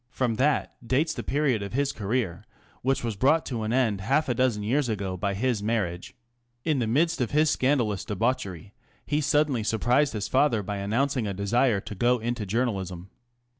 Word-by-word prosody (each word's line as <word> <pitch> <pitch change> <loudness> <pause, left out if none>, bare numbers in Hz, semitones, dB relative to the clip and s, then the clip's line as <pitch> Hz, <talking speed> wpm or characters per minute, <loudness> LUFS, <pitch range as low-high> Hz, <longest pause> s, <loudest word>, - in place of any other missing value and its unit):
From 125 -3 -1
that 145 +4 +1
dates 140 +7 +1
the - - -5
period 140 -6 0
of 100 +1 -6
his 140 +2 +1
career, 105 -5 -2 0.4
which 135 0 0
was 115 -3 -2
brought 140 +10 +3
to 120 -4 -3
an 110 0 -2
end 115 -6 +1
half 140 +10 +1
a 125 - +1
dozen 120 -4 +1
years 125 +4 +1
ago 100 -4 -2
by 100 +2 -2
his 120 0 0
marriage. 100 -5 -2 0.5
In 155 -4 +1
the 115 - 0
midst 160 +7 +1
of 120 - 0
his 155 +1 +3
scandalous 125 -9 +1
debauchery 100 -4 -2 0.3
he 150 +1 0
suddenly 150 -4 +2
surprised 120 +6 +2
his 105 -2 -3
father 130 -5 +2
by 100 +1 -4
announcing 115 +4 0
a 100 - -3
desire 105 +3 +2
to - - -7
go 120 +5 +2
into 115 -2 -3
journalism. 95 -5 -2
120 Hz, 185 wpm, -26 LUFS, 105-135 Hz, 0.5 s, brought